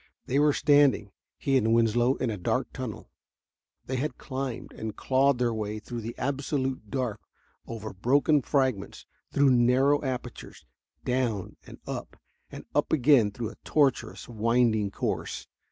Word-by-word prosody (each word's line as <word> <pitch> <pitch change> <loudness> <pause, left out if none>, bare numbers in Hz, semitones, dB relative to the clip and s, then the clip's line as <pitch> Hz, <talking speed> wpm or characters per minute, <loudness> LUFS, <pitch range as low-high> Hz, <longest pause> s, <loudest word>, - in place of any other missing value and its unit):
They 135 - +1
were 150 0 +5
standing, 145 -8 +3 0.3
he 135 -1 +2
and 115 -2 +3
Winslow, 120 +3 +3
in 125 - -1
a - - -2
dark 90 - -1
tunnel. - - -6 0.7
They 130 - -2
had 135 0 -2
climbed 130 -2 -5
and 110 -1 -6
clawed 135 0 +2
their 120 -1 +1
way 110 -1 -3
through 120 +2 -6
the 115 +2 -6
absolute 135 -4 -2
dark, 125 -5 -2 0.5
over 110 -2 -6
broken 140 - +3
fragments, 130 -8 -1 0.3
through 140 -1 +4
narrow 130 +4 +4
apertures, 125 -2 -6 0.4
down 120 -6 -1
and - - -11
up, - - -6 0.3
and - - -9
up - - +1
again 135 -7 +5
through 110 +2 -5
a - - -14
tortuous, 140 -4 +1
winding 115 -2 +2
course. - - -3
125 Hz, 145 wpm, -27 LUFS, 115-135 Hz, 0.7 s, were